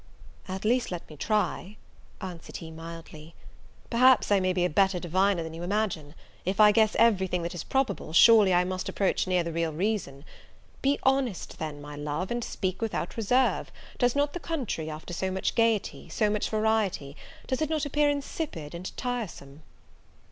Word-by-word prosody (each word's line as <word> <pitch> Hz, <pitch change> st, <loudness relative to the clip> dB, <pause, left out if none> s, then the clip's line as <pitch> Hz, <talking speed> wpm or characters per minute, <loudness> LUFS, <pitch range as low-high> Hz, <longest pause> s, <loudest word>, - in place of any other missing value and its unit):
"At 190 Hz, +2 st, -5 dB
least 245 Hz, +3 st, +2 dB
let 175 Hz, -2 st, -5 dB
me -, -, -9 dB
try," 210 Hz, +2 st, -1 dB, 0.4 s
answered 180 Hz, -3 st, -7 dB
he, 165 Hz, -1 st, -9 dB
mildly; 165 Hz, -1 st, -10 dB, 0.6 s
"perhaps 250 Hz, -1 st, +5 dB
I 200 Hz, -, +5 dB
may 185 Hz, 0 st, +1 dB
be 180 Hz, -1 st, +1 dB
a -, -, +4 dB
better 190 Hz, +2 st, +2 dB
diviner 185 Hz, +1 st, +1 dB
than 160 Hz, 0 st, -7 dB
you 165 Hz, -, -7 dB
imagine: 175 Hz, -6 st, -2 dB, 0.3 s
if 190 Hz, +2 st, -2 dB
I 210 Hz, -1 st, +8 dB
guess 215 Hz, 0 st, +3 dB
every 215 Hz, -5 st, +4 dB
thing 180 Hz, -1 st, -2 dB
that 170 Hz, -, -3 dB
is 175 Hz, -, -5 dB
probable, 265 Hz, -11 st, -1 dB
surely 210 Hz, +3 st, +7 dB
I 180 Hz, 0 st, +4 dB
must 185 Hz, 0 st, -3 dB
approach 195 Hz, -1 st, 0 dB
near 180 Hz, -1 st, +2 dB
the 170 Hz, -, -4 dB
real 165 Hz, 0 st, -1 dB
reason. 160 Hz, -5 st, -2 dB, 0.6 s
Be 275 Hz, +1 st, +2 dB
honest, 265 Hz, -7 st, 0 dB
then, 155 Hz, -2 st, -4 dB
my 145 Hz, 0 st, -9 dB
love, 150 Hz, +6 st, -3 dB
and 240 Hz, 0 st, -1 dB
speak 190 Hz, -2 st, -3 dB
without 225 Hz, -1 st, -2 dB
reserve; 245 Hz, +4 st, +1 dB, 0.3 s
does 245 Hz, 0 st, +2 dB
not 285 Hz, 0 st, +1 dB
the 355 Hz, -, -4 dB
country, 250 Hz, -, -3 dB
after 155 Hz, +3 st, -7 dB
so 190 Hz, +2 st, -1 dB
much 190 Hz, 0 st, -1 dB
gaiety, 230 Hz, -3 st, 0 dB
so 210 Hz, -1 st, +1 dB
much 210 Hz, -1 st, -1 dB
variety, 215 Hz, -10 st, 0 dB, 0.3 s
does 260 Hz, +3 st, -2 dB
it 310 Hz, -, 0 dB
not 310 Hz, -3 st, 0 dB
appear 295 Hz, +1 st, +2 dB
insipid 285 Hz, -, -4 dB
and 175 Hz, +2 st, -7 dB
tiresome?" 200 Hz, -, -5 dB
190 Hz, 180 wpm, -28 LUFS, 170-230 Hz, 0.6 s, I